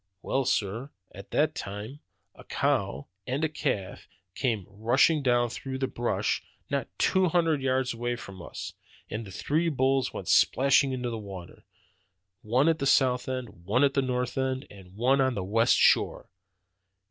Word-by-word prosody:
"Well, 135 Hz, 0 st, 0 dB
sir, 115 Hz, +1 st, -1 dB, 0.2 s
at -, -, -11 dB
that, -, -, +1 dB, 0.7 s
a -, -, -15 dB
cow 70 Hz, +2 st, 0 dB, 0.2 s
and 135 Hz, +5 st, -1 dB
a -, -, +3 dB
calf 100 Hz, -10 st, -3 dB, 0.3 s
came 110 Hz, -7 st, -1 dB
rushing 120 Hz, +10 st, +2 dB
down 120 Hz, -3 st, +2 dB
through 130 Hz, +1 st, -5 dB
the 130 Hz, -, 0 dB
brush 120 Hz, -2 st, -1 dB, 0.3 s
not -, -, -1 dB
two 190 Hz, -1 st, +3 dB
hundred 165 Hz, -4 st, +2 dB
yards 130 Hz, -1 st, 0 dB
away 120 Hz, +1 st, -2 dB
from 95 Hz, -6 st, -10 dB
us, -, -, -7 dB, 0.4 s
and 110 Hz, 0 st, -4 dB
the -, -, -10 dB
three 155 Hz, -, 0 dB
bulls 135 Hz, -2 st, +1 dB
went -, -, -7 dB
splash 135 Hz, +1 st, +4 dB
into 130 Hz, -3 st, -2 dB
the 115 Hz, -, -4 dB
water, 95 Hz, -4 st, -10 dB, 0.8 s
one 125 Hz, +7 st, +2 dB
at 165 Hz, -1 st, +2 dB
the 140 Hz, -, 0 dB
south 130 Hz, -2 st, +3 dB
end, 130 Hz, -2 st, -3 dB, 0.2 s
one 120 Hz, +8 st, +2 dB
at 140 Hz, -1 st, +3 dB
the 140 Hz, -, +2 dB
north 125 Hz, 0 st, -2 dB
end, 130 Hz, +1 st, -1 dB
and 95 Hz, -2 st, -14 dB
one 130 Hz, +5 st, +3 dB
on 130 Hz, -2 st, +1 dB
the 100 Hz, -, -2 dB
west 115 Hz, +5 st, +3 dB
shore. -, -, +3 dB
125 Hz, 165 wpm, -28 LUFS, 115-135 Hz, 0.8 s, splash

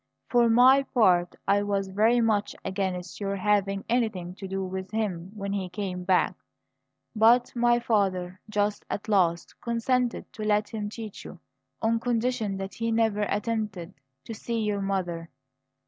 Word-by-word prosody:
For 240 Hz, -1 st, +4 dB
my 255 Hz, +4 st, +6 dB
part, 185 Hz, -10 st, +2 dB
I 200 Hz, +1 st, +4 dB
was 200 Hz, -1 st, -1 dB
very 220 Hz, +5 st, +3 dB
much 210 Hz, -2 st, +1 dB
against 190 Hz, -2 st, -3 dB
your 200 Hz, 0 st, -1 dB
having 195 Hz, 0 st, +1 dB
anything 215 Hz, -7 st, -1 dB
to 195 Hz, -, -6 dB
do 195 Hz, 0 st, -3 dB
with 190 Hz, 0 st, -5 dB
him 195 Hz, -5 st, -2 dB
when 200 Hz, -1 st, -4 dB
he 190 Hz, -2 st, -2 dB
came 180 Hz, -1 st, -4 dB
back; 185 Hz, -1 st, +3 dB, 0.8 s
but 235 Hz, +4 st, +4 dB
my 240 Hz, 0 st, +4 dB
father, 185 Hz, -5 st, 0 dB
just 210 Hz, 0 st, 0 dB
at 200 Hz, -, -3 dB
the 220 Hz, -, -5 dB
last, 175 Hz, -4 st, +2 dB
consented 240 Hz, +1 st, 0 dB
to -, -, -8 dB
let 210 Hz, 0 st, +1 dB
him 210 Hz, -2 st, -4 dB
teach 220 Hz, -2 st, -8 dB
you, 185 Hz, -, -10 dB, 0.4 s
on 225 Hz, +1 st, +2 dB
condition 230 Hz, -4 st, -1 dB
that 195 Hz, 0 st, -5 dB
he 230 Hz, 0 st, -2 dB
never 220 Hz, -2 st, +1 dB
attempted 205 Hz, -4 st, -2 dB, 0.3 s
to 225 Hz, -, -6 dB
see 230 Hz, +1 st, -3 dB
your 210 Hz, -2 st, -1 dB
mother. 175 Hz, -4 st, -2 dB
205 Hz, 160 wpm, -27 LUFS, 190-225 Hz, 0.8 s, my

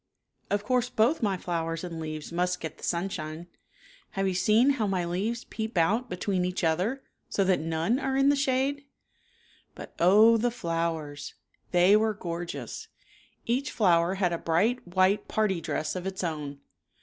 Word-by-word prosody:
Of 205 Hz, 0 st, 0 dB
course, 245 Hz, +1 st, +1 dB
both 250 Hz, +5 st, +2 dB
my 200 Hz, -4 st, +1 dB
flowers 165 Hz, -2 st, -3 dB
and 170 Hz, -2 st, -5 dB
leaves 155 Hz, -1 st, -6 dB
must 180 Hz, +1 st, 0 dB
get 160 Hz, -3 st, -7 dB
the -, -, -16 dB
sunshine. 170 Hz, -2 st, -3 dB, 0.7 s
Have 195 Hz, -1 st, 0 dB
you 190 Hz, -, 0 dB
seen 215 Hz, +9 st, +4 dB
how 230 Hz, -7 st, 0 dB
my 185 Hz, -3 st, 0 dB
leaves 210 Hz, +7 st, -2 dB
peep 220 Hz, -3 st, -5 dB
out 210 Hz, +9 st, +2 dB
between 180 Hz, +1 st, -1 dB
each 180 Hz, 0 st, -2 dB
other, 185 Hz, +12 st, 0 dB, 0.3 s
so 200 Hz, -, +1 dB
that 185 Hz, -1 st, +2 dB
none 165 Hz, +9 st, 0 dB
are 265 Hz, -1 st, -1 dB
in 275 Hz, +1 st, +4 dB
the 285 Hz, -, +4 dB
shade? 275 Hz, +1 st, 0 dB, 0.4 s
" -, -, -34 dB
But -, -, -10 dB
oh, 215 Hz, +6 st, +6 dB
the 240 Hz, +2 st, +1 dB
flowers! 165 Hz, -8 st, -3 dB, 0.3 s
They 180 Hz, +3 st, +5 dB
were 215 Hz, 0 st, +2 dB
gorgeous. 170 Hz, -2 st, -6 dB, 0.6 s
Each 255 Hz, +4 st, 0 dB
flower 175 Hz, -3 st, +3 dB
had 180 Hz, -3 st, +1 dB
a 170 Hz, -, -2 dB
bright 200 Hz, +8 st, +1 dB
white 185 Hz, +3 st, +2 dB
party 200 Hz, -5 st, 0 dB
dress 155 Hz, 0 st, -2 dB
of 185 Hz, +1 st, -4 dB
its 190 Hz, -1 st, -4 dB
own. 150 Hz, -4 st, -4 dB
185 Hz, 170 wpm, -28 LUFS, 170-225 Hz, 0.7 s, oh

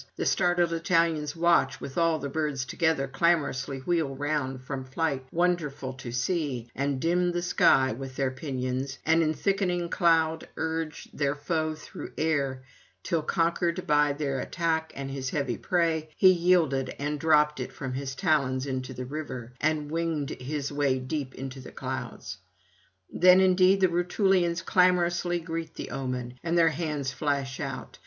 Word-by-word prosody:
The -, -, -3 dB
startled 175 Hz, -1 st, +2 dB
Italians 165 Hz, -3 st, +1 dB
watch, 170 Hz, -5 st, +3 dB
while -, -, -6 dB
all 165 Hz, -1 st, +3 dB
the 140 Hz, -2 st, -4 dB
birds 140 Hz, -3 st, -2 dB
together 160 Hz, 0 st, 0 dB
clamorously 135 Hz, -3 st, 0 dB
wheel 160 Hz, -3 st, 0 dB
round 135 Hz, -2 st, -2 dB
from 135 Hz, 0 st, -4 dB
flight, 130 Hz, 0 st, -2 dB
wonderful 165 Hz, -6 st, 0 dB
to 125 Hz, -2 st, -8 dB
see, 125 Hz, -2 st, -2 dB
and 140 Hz, 0 st, -1 dB
dim 175 Hz, +3 st, +1 dB
the 175 Hz, 0 st, -1 dB
sky 135 Hz, -6 st, +4 dB
with 130 Hz, +2 st, -7 dB
their 135 Hz, -1 st, 0 dB
pinions, 130 Hz, 0 st, -3 dB
and 160 Hz, +1 st, +4 dB
in 155 Hz, -1 st, +1 dB
thickening 180 Hz, -3 st, 0 dB
cloud 160 Hz, -2 st, +2 dB
urge 160 Hz, -1 st, -3 dB
their 145 Hz, -1 st, 0 dB
foe 155 Hz, +1 st, -1 dB
through 155 Hz, -, -9 dB
air, 140 Hz, -5 st, 0 dB, 0.4 s
till, 165 Hz, -3 st, 0 dB
conquered 170 Hz, +2 st, 0 dB
by 150 Hz, -3 st, +3 dB
their 140 Hz, -2 st, -2 dB
attack 160 Hz, +1 st, -1 dB
and 135 Hz, 0 st, -5 dB
his 135 Hz, -1 st, -3 dB
heavy 140 Hz, -5 st, -1 dB
prey, 165 Hz, -3 st, 0 dB
he 185 Hz, -, +7 dB
yielded 170 Hz, -7 st, +2 dB
and 145 Hz, +1 st, -2 dB
dropped 150 Hz, -1 st, +3 dB
it 125 Hz, -, -4 dB
from 135 Hz, -3 st, -5 dB
his 135 Hz, 0 st, -4 dB
talons 135 Hz, -4 st, +1 dB
into 130 Hz, -1 st, -4 dB
the 125 Hz, +1 st, -5 dB
river, 130 Hz, -4 st, -6 dB
and 150 Hz, -1 st, 0 dB
winged 165 Hz, -3 st, -1 dB
his 140 Hz, +2 st, -4 dB
way 140 Hz, -2 st, +1 dB
deep 130 Hz, +1 st, -4 dB
into 135 Hz, 0 st, -6 dB
the 130 Hz, -, -10 dB
clouds. 130 Hz, -6 st, -6 dB, 0.7 s
Then 180 Hz, +1 st, +6 dB
indeed 190 Hz, +1 st, +4 dB
the 185 Hz, -, +6 dB
Rutulians 175 Hz, 0 st, +1 dB
clamorously 175 Hz, -1 st, +2 dB
greet 165 Hz, -1 st, -5 dB
the -, -, -6 dB
omen, 125 Hz, -2 st, -4 dB
and 170 Hz, 0 st, 0 dB
their 165 Hz, -1 st, +6 dB
hands 150 Hz, -4 st, -2 dB
flash 140 Hz, -2 st, -2 dB
out. 130 Hz, -4 st, -6 dB
150 Hz, 160 wpm, -27 LUFS, 135-170 Hz, 0.7 s, he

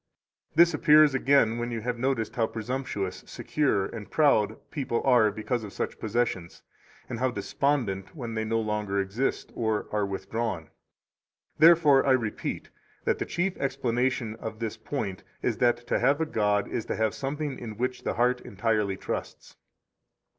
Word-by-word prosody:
This 170 Hz, +1 st, +6 dB
appears 150 Hz, 0 st, +6 dB
again 130 Hz, -4 st, +3 dB
when 120 Hz, 0 st, -2 dB
you 115 Hz, -1 st, -3 dB
notice 120 Hz, -3 st, -1 dB
how 115 Hz, -2 st, 0 dB
presumptuous, 110 Hz, -5 st, -4 dB
secure, 135 Hz, -10 st, 0 dB
and 105 Hz, 0 st, -8 dB
proud 110 Hz, -8 st, +3 dB
people 130 Hz, -5 st, -2 dB
are 120 Hz, -5 st, +5 dB
because 110 Hz, +3 st, -3 dB
of 100 Hz, -, -8 dB
such -, -, -4 dB
possessions, 110 Hz, -6 st, -2 dB, 0.4 s
and 120 Hz, -3 st, -5 dB
how 130 Hz, +1 st, +2 dB
despondent 125 Hz, -, -1 dB
when 120 Hz, -6 st, -5 dB
they 110 Hz, 0 st, -1 dB
no 115 Hz, +1 st, 0 dB
longer 105 Hz, -2 st, -1 dB
exist 100 Hz, +7 st, -2 dB
or 110 Hz, -2 st, -1 dB
are 105 Hz, -1 st, 0 dB
withdrawn. 100 Hz, -3 st, -3 dB, 0.9 s
Therefore 155 Hz, -4 st, +7 dB
I 135 Hz, -, +4 dB
repeat 115 Hz, -4 st, -2 dB, 0.3 s
that -, -, +1 dB
the -, -, -1 dB
chief 180 Hz, +2 st, -1 dB
explanation 125 Hz, -3 st, -1 dB
of 110 Hz, -1 st, -6 dB
this 110 Hz, -1 st, -3 dB
point 110 Hz, -4 st, -4 dB, 0.2 s
is -, -, 0 dB
that 120 Hz, -1 st, +2 dB
to -, -, 0 dB
have 140 Hz, +2 st, +3 dB
a 160 Hz, -, +1 dB
god 105 Hz, -7 st, +1 dB
is 110 Hz, -, -3 dB
to -, -, -2 dB
have 110 Hz, -1 st, +1 dB
something 145 Hz, +1 st, -4 dB
in 110 Hz, -3 st, -7 dB
which 125 Hz, +2 st, -2 dB
the -, -, -2 dB
heart 125 Hz, +1 st, +2 dB
entirely 105 Hz, -2 st, -1 dB
trusts. -, -, -6 dB
115 Hz, 160 wpm, -27 LUFS, 105-135 Hz, 0.9 s, Therefore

